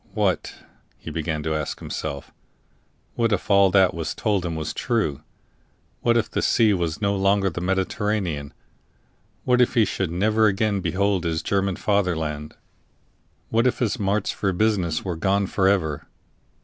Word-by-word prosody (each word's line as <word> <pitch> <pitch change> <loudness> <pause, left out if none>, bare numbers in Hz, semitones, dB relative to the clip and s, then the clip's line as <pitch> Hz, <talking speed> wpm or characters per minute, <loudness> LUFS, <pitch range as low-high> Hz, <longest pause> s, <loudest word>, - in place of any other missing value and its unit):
What, - - 0 0.4
he - - -8
began 80 -1 -3
to 80 - -1
ask 75 -2 -3
himself 70 -1 -6 0.8
what 115 -1 0
if 105 +1 -1
all 100 -1 +6
that 95 -1 +4
was 80 -1 -4
told 105 -4 0
him 85 -2 -3
was 80 -1 -4
true? 105 - -1 0.8
What 120 0 +3
if 115 - +1
this - - -1
sea 110 -3 +4
was 85 +1 -2
no 100 0 +2
longer 100 0 +2
the 85 - -5
Mediterranean? 95 -4 -1 0.9
What 125 0 +3
if 125 - +2
he 115 -3 +5
should 95 -4 -2
never 110 +5 +2
again 105 0 +1
behold 95 +2 0
his 80 -2 -1
German 100 -1 0
fatherland? 80 -8 -1 0.9
What 115 +3 +2
if 125 - 0
his 120 0 -1
marts 100 +1 0
for 100 - -1
business 90 -5 0
were 90 -3 -2
gone 100 +4 +1
for 95 0 +1
ever? 80 -7 0
95 Hz, 160 wpm, -23 LUFS, 85-105 Hz, 0.9 s, all